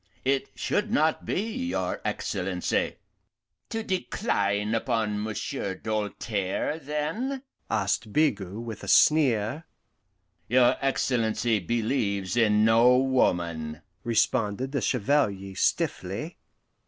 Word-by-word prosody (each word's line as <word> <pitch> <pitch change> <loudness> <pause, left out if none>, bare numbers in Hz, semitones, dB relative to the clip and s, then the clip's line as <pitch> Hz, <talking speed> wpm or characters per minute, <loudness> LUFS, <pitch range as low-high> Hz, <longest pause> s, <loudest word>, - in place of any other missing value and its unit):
it 135 0 +1
should 210 +1 -1
not 160 -8 +1
be, 230 +6 -2
your - - -2
Excellency." - - -1 0.7
"To 225 -1 -3
decline 105 - -1
upon 110 -3 0
Monsieur 105 -2 -3
Doltaire, 105 +5 -2
then?" 165 - -3 0.3
asked 105 +1 0
Bigot, 105 - +1
with 115 -2 -7
a - - -7
sneer. 140 -2 +4 0.8
"Your 125 +1 +4
Excellency 120 -4 +1
believes 105 -2 -1
in 105 -2 +4
no 115 +3 +6
woman," 85 -12 0 0.2
responded 115 +1 +1
the 140 - -1
Chevalier 100 -6 +1
stiffly. - - -1
115 Hz, 95 wpm, -27 LUFS, 105-140 Hz, 0.8 s, no